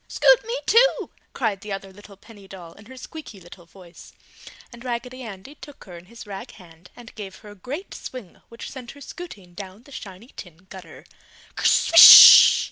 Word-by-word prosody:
"Scoot - - 0
me 465 +3 -7
too!" 485 +3 -1 0.2
cried 215 -6 -6
the 210 - -12
other 195 -1 -10
little 205 0 -19
penny 205 -1 -20
doll 180 -4 -15
in 205 +1 -21
her 260 +1 -16
squeeky 255 -5 -14
little 175 -1 -19
voice, 180 -1 -19 0.6
and 240 0 -16
Raggedy 250 +1 -9
Andy 215 +2 -13
took 290 -1 -17
her 180 -3 -16
in 170 +1 -16
his 230 +4 -16
rag 195 -2 -12
hand 170 -1 -21
and 240 -2 -17
gave 195 -3 -12
her 210 - -18
a - - -15
great 275 - -11
swing 245 -9 -14
which 230 - -13
sent 250 -3 -13
her 285 - -20
scooting 215 - -14
down 195 +3 -14
the 280 - -22
shiny 205 0 -14
tin 175 0 -16
gutter, 190 -1 -16 0.5
"Kerswish!" 330 - +6
205 Hz, 185 wpm, -19 LUFS, 190-255 Hz, 0.6 s, Kerswish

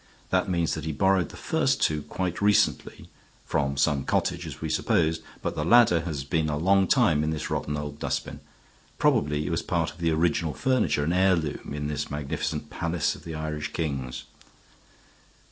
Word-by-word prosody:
That 95 +1 +2
means 85 -3 +1
that - - -4
he 80 - -1
borrowed 95 0 +2
the - - -11
first - - +1
two 75 -1 +1
quite 90 +4 -4
recently 105 0 +1 0.4
from 70 -1 -1
some 70 -1 +2
cottage, - - -1
as - - -8
we - - -3
supposed, 80 -1 +1 0.2
but - - -1
the 75 - -2
ladder 115 -2 +6
has 75 -6 -3
been 80 +2 0
a 75 - -1
long 95 +4 +3
time 90 - +3
in 75 - 0
this 80 -2 -3
rotten 75 0 -2
old 75 0 -6
dustbin. - - -3 0.6
Probably 75 +1 +2
it - - -2
was 85 - 0
part 85 -2 -1
of 80 - -17
the 85 -1 +1
original 80 -2 +1
furniture, 130 - +1
an 80 +4 0
heirloom 90 -6 +1
in 75 0 -3
this 75 0 -3
magnificent 75 +2 -3
palace 85 -1 -1
of - - -13
the 80 -1 -5
Irish 75 -1 -4
kings." 65 -6 -3
80 Hz, 180 wpm, -26 LUFS, 75-85 Hz, 0.6 s, ladder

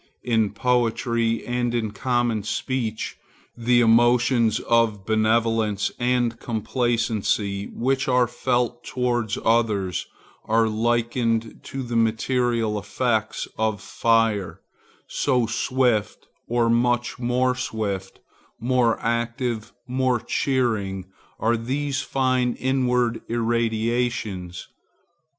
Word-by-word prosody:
In 110 -3 +2
poetry 115 0 0
and 120 0 -1
in 110 -3 -1
common 120 0 0
speech, 110 +1 -3 0.4
the 120 +1 +3
emotions 120 0 +4
of 115 -4 +1
benevolence 110 -1 +1
and 120 -1 +1
complacency 110 -4 -1
which 135 +2 -1
are 125 -1 +4
felt 120 0 -1
towards 120 -4 -1
others 105 -5 +1 0.4
are 115 +1 +3
likened 115 0 0
to 135 0 -5
the 120 -1 -4
material 115 -1 +1
effects 110 +1 -1
of 110 -2 0
fire; 105 -6 +1 0.5
so 125 -2 +1
swift, 120 -2 0 0.2
or 120 0 +2
much 120 +1 +1
more 125 +1 +1
swift, 100 -6 -4 0.4
more 120 -1 +2
active, 115 0 -2 0.2
more 130 -1 +1
cheering, 110 -9 -1 0.3
are 115 +2 +2
these 135 +4 -2
fine 130 -2 0
inward 125 -3 +1
irradiations. 115 -5 -1
115 Hz, 95 wpm, -23 LUFS, 110-125 Hz, 0.5 s, emotions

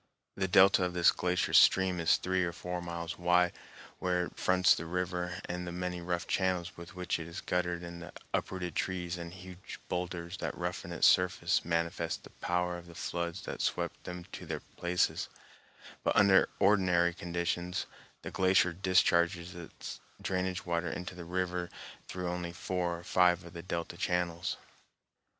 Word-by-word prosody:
The 95 -1 0
delta 95 +1 +6
of 90 -1 -1
this 85 -1 +6
glacier 90 0 0
stream 95 -2 +6
is 85 - +4
three 95 0 0
or 85 -1 -2
four 90 +1 -4
miles 85 0 -5
wide 90 0 +4 0.5
where 90 -1 +1
it - - -11
fronts 90 -1 +4
the 85 - -4
river, 90 0 -2
and 90 0 -4
the - - -3
many 90 0 -3
rough 85 +1 -2
channels 90 -2 0
with 85 +1 -11
which 90 -2 -1
it 80 - -6
is 85 - -6
guttered 90 -1 -1
and 85 0 -7
the 85 - -9 0.2
uprooted 90 -3 -2
trees 90 0 -2
and 85 0 -6
huge 90 0 -10
boulders 90 0 -3
that - - -4
roughen 90 +1 -4
its 85 - +2
surface 90 -1 +4
manifest 85 0 -1
the - - -13
power 90 0 -1
of 85 - -14
the 85 - -12
floods 85 +1 -3
that - - -5
swept - - -1
them 90 0 -6
to 90 - -8
their 75 -1 -3
places; 90 +1 0 0.7
but - - +1
under 100 -1 +6
ordinary 90 -4 +4
conditions 85 0 -2 0.4
the - - -5
glacier 95 -1 +3
discharges 90 -1 +2
its 85 -2 -8 0.2
drainage 95 -1 -2
water 85 0 0
into 90 +3 -5
the 90 -1 -8
river 90 0 -2 0.4
through 90 -1 -4
only 90 0 -3
four 85 0 -2
or 85 - -11
five 90 0 +3
of 85 0 -11
the 85 - -6
delta 85 -1 -4
channels. 90 -1 -1
90 Hz, 170 wpm, -32 LUFS, 85-90 Hz, 0.7 s, delta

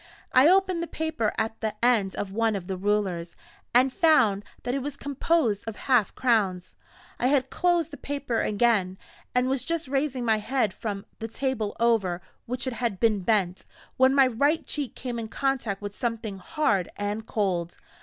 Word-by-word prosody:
I 255 +3 +7
opened 370 -1 +3
the 340 - -3
paper 315 -11 -1
at 220 0 -2
the 215 -1 -2
end 215 -6 +2
of 195 - -4
one 225 +1 +1
of 190 -3 -4
the 190 0 -3
rulers, 185 -3 -1 0.4
and 255 +2 +4
found 260 - +4 0.2
that 245 - -2
it 275 - -1
was 280 +1 -5
composed 280 -6 0
of 225 - -4
half 245 -6 +1
crowns. 205 -8 +1 0.4
I 245 - +2
had 270 -1 +2
closed 345 -3 +1
the 285 - -8
paper 280 -5 -2
again, 205 -4 +1 0.4
and 250 +1 +3
was 260 -1 0
just 330 0 -2
raising 270 -2 -1
my 220 -1 +3
head 220 -2 0
from 200 -1 -5
the 225 - -4
table 230 -3 -2
over 220 -7 +2 0.3
which 250 +2 -2
it 260 - -2
had 230 -4 -2
been 220 -3 +3
bent, 190 -2 0 0.3
when 260 +1 +5
my 270 -1 +7
right 280 +6 +1
cheek 290 -4 -4
came 245 -2 -4
in 225 - -4
contact 235 -5 -2
with 205 0 -5
something 225 -5 -3
hard 200 - 0
and 205 +2 -3
cold. 180 -5 -1
230 Hz, 180 wpm, -26 LUFS, 205-270 Hz, 0.4 s, I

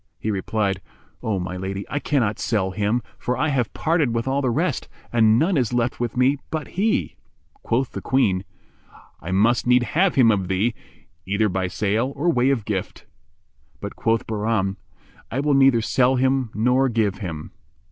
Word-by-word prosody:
He 110 - -2
replied, 100 0 -1 0.4
"O 110 -3 -1
my 90 0 -4
lady, 95 +1 -4
I 145 - -2
cannot 125 -9 0
sell 95 -4 0
him, 105 +5 0 0.2
for 125 0 -2
I 150 +4 +1
have 125 -5 0
parted 155 -7 0
with 115 +2 -1
all 135 +1 +1
the 130 - +1
rest 115 - -1 0.2
and 110 -2 +5
none 165 +6 +2
is 125 -2 0
left 120 0 0
with 120 0 -3
me 130 +3 +3
but 155 -3 -4
he." 210 +4 0 0.4
Quoth 125 +2 0
the - - -6
Queen, 100 -9 +1 0.8
"I 85 - -7
must 110 +7 +2
need 125 0 +5
have 180 +9 +1
him 125 -5 +6
of 95 -4 0
thee, 100 +5 +1 0.5
either 105 +2 +1
by 95 0 -1
sale 110 +7 0
or 165 +5 +1
way 125 -3 +2
of 125 -7 0
gift." 95 -4 -4 0.7
But 100 - -6
quoth 115 0 0
Bahram, 105 -3 -1 0.5
"I 130 - -2
will 145 +1 +2
neither 135 -4 +5
sell 125 +3 +2
him 130 -1 +1
nor 125 +5 +3
give 110 -5 0
him." 80 -6 -6
115 Hz, 180 wpm, -23 LUFS, 100-130 Hz, 0.8 s, him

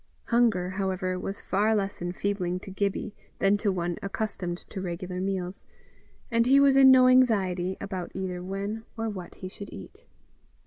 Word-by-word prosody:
Hunger, 225 -7 +2
however, 185 -1 -2
was 195 +2 -5
far 210 +3 +1
less 200 -3 -2
enfeebling 180 0 -2
to 195 - -9
Gibbie 200 +2 -2 0.2
than 195 +1 +3
to 205 -1 0
one 175 -2 -2
accustomed 195 -3 -3
to 195 - -4
regular 180 0 -4
meals, 190 -1 -3 0.6
and 230 0 +3
he 275 +2 +6
was 280 -1 +5
in 270 -1 +8
no 255 -1 +7
anxiety 190 -8 +3
about 185 -3 -5
either 185 -2 -3
when 200 +4 -4
or 225 0 -1
what 185 -4 -7
he 185 - -7
should 200 +2 -9
eat. - - -12
195 Hz, 165 wpm, -27 LUFS, 185-215 Hz, 0.6 s, in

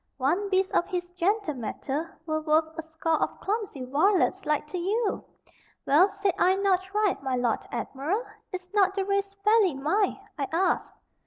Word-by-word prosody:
One 340 +10 0
beast 380 0 +2
of - - +2
his 355 -2 -4
gentle 365 -1 0
mettle 275 +5 -4 0.2
were 310 -1 -1
worth 315 +1 +1
a - - -4
score 320 0 -1
of - - -2
clumsy 395 - -3
varlets 370 +6 +2
like 300 -1 +1
to 360 - -3
you! 410 +4 0 0.6
Well, 335 +8 +5
said 395 -1 -1
I 370 +1 +4
not 380 -1 +1
right, 415 -5 +1
my 265 -2 -1
Lord 245 -2 0
Admiral; 325 - -2 0.3
is 365 0 -7
not 390 -2 +3
the 390 -1 0
race 400 0 -1
fairly 420 -6 +4
mine, 355 +11 0 0.2
I 275 - 0
ask?" 355 +3 0
360 Hz, 170 wpm, -27 LUFS, 310-395 Hz, 0.6 s, Well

